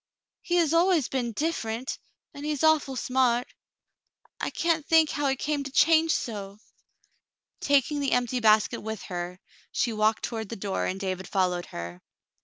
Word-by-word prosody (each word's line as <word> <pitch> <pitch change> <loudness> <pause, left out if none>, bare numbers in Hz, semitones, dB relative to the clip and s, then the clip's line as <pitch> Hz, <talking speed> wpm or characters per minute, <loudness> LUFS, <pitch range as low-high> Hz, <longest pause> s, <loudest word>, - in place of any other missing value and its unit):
He 350 - -1
has 330 -3 +3
always 335 -4 +3
been 245 -3 -1
differ 300 -2 -2
ent 235 +4 -4 0.2
— - - -54
and 285 -1 -9
he 300 - -2
is 290 - -4
awful 310 -4 +3
smart. 250 -1 +1 0.9
I - - -2
can't 330 -2 0
think 320 0 +4
how 290 0 -2
came 295 +2 -2
he 280 - -5
to 275 - -6
change 320 +3 +4
so." 200 -3 -5 1.0
Taking 285 +1 +2
the 280 -2 0
empty 245 0 +1
basket 215 -2 +3
with 220 -1 -5
her, 180 0 -5 0.3
she 235 - 0
walked 215 0 +1
toward 220 -3 -4
the - - -5
door, 195 -1 -2
and 190 - -3
David 190 -2 -3
followed 180 -2 0
her. 85 +1 -7
245 Hz, 175 wpm, -27 LUFS, 210-295 Hz, 1.0 s, think